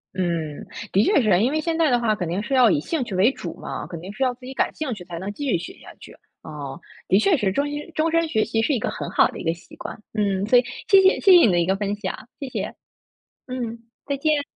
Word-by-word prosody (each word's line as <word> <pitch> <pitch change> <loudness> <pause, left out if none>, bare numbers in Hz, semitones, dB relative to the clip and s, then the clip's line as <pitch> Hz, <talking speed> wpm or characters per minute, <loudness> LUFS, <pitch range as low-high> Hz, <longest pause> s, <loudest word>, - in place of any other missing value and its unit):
嗯， 170 -5 -2 0.3
的 200 +3 +4
确 395 -5 +4
是 215 - +1
啊， 175 - +6
因 240 +8 +2
为 310 - 0
现 325 +1 -1
在 320 -3 +3
的 245 -1 +3
话 220 -2 +1
肯 180 -5 -3
定 185 +4 -1
是 270 - -4
要 250 -4 +6
以 145 - +2
兴 295 - -2
趣 200 -5 -5
为 205 +8 +4
主 - - -7
嘛， - - -6
肯 170 -3 -7
定 190 +4 -8
是 265 - -1
要 255 - +2
自 250 0 -14
己 265 - -7
感 - - 0
兴 290 -6 -3
趣 185 -4 -8
才 170 -2 -7
能 190 +4 -4
继 285 - -5
续 180 - +3
学 175 - -7
下 - - -13
去， - - -12 0.3
啊， 145 +1 -7 0.3
的 190 - +4
确 360 - +4
是 205 -8 0
终 285 +8 0
身 295 +3 -6
终 320 +1 +1
身 330 0 +2
学 220 -7 +1
习 225 0 0
是 285 - +1
一 240 - +1
个 - - -2
很 - - -5
好 - - +4
的 - - -9
一 - - -6
个 165 - +1
习 170 - -16
惯， - - -8
嗯， 200 -2 0
所 245 +3 +5
以 - - 0 0.2
谢 390 -1 +7
谢 380 - +4
谢 390 - +5
谢 360 - +10
你 - - +3
的 175 - +2
一 170 - +2
个 190 +1 +1
分 205 0 -2
享， 210 +3 -6
谢 275 - -5
谢。 - - -4 0.7
嗯， 240 -2 -4 0.3
再 280 - -1
见。 300 +1 +1
225 Hz, 310 characters per minute, -23 LUFS, 190-285 Hz, 0.7 s, 谢